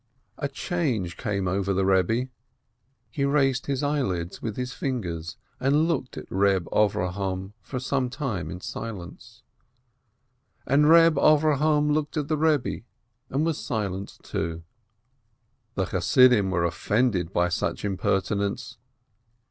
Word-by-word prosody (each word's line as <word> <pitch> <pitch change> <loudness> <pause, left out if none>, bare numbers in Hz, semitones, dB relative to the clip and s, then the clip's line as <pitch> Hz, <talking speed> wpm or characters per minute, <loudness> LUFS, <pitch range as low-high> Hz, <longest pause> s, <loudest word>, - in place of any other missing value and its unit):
A 140 - -1
change 135 - -2
came 100 -2 -2
over 95 +1 0
the 95 - +2
Eebbe, 95 +7 +2 0.8
he 140 - -2
raised 135 -2 +2
his 140 0 -1
eyelids 100 - -1
with 110 -3 -4
his 125 0 -3
fingers, 85 - -4 0.2
and 145 +5 +3
looked 135 -6 -2
at - - -7
Eeb 95 0 +3
Avrohom 95 -1 0
for 130 +6 -5
some 130 0 -1
time 120 - -3
in 90 - -7
silence. 110 +2 -8 1.2
And 140 +3 +4
Eeb 165 0 +6
Avrohom 150 0 +3
looked 150 0 -1
at 150 -1 -2
the 155 - +2
Eebbe, 150 -7 +1 0.5
and 140 +4 0
was 165 -3 -2
silent 100 -4 -3
too. 85 0 -4 1.1
The 95 - 0
Chassidim 100 +3 +4
were 85 -2 +1
offended 95 +1 0
by 90 -2 +1
such 85 - -2
impertinence. 100 +1 -1
115 Hz, 125 wpm, -26 LUFS, 95-140 Hz, 1.2 s, Eeb